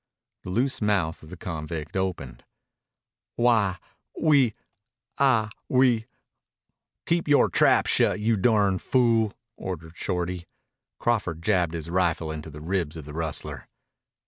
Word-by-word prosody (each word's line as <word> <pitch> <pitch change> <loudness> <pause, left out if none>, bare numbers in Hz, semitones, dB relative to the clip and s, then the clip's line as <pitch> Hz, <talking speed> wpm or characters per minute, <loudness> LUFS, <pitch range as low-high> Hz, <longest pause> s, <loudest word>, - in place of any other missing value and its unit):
The - - -8
loose 125 +8 0
mouth 95 -6 0
of 80 - -13
the 90 - -9
convict 80 -1 -5
opened. 90 -10 -3 0.9
"Why, 110 -6 +3 0.4
we 140 -8 +4 0.6
I 115 -6 +3 0.2
we 125 -3 +3 0.5
" - - -59
"Keep 170 -1 0
yore 145 -1 +5
trap - - +4
shut, - - +2
you 110 +2 +2
durn 100 -2 +2
fool," 115 -4 +2 0.2
ordered 85 -3 -6
Shorty. 90 -2 -3 0.5
Crawford 90 -9 -1
jabbed 90 -4 +1
his 85 0 -5
rifle 85 -3 0
into 80 0 -6
the 75 0 -10
ribs 85 -2 -2
of 80 - -8
the 75 - -9
rustler. 80 -1 -3
95 Hz, 130 wpm, -26 LUFS, 80-115 Hz, 0.9 s, yore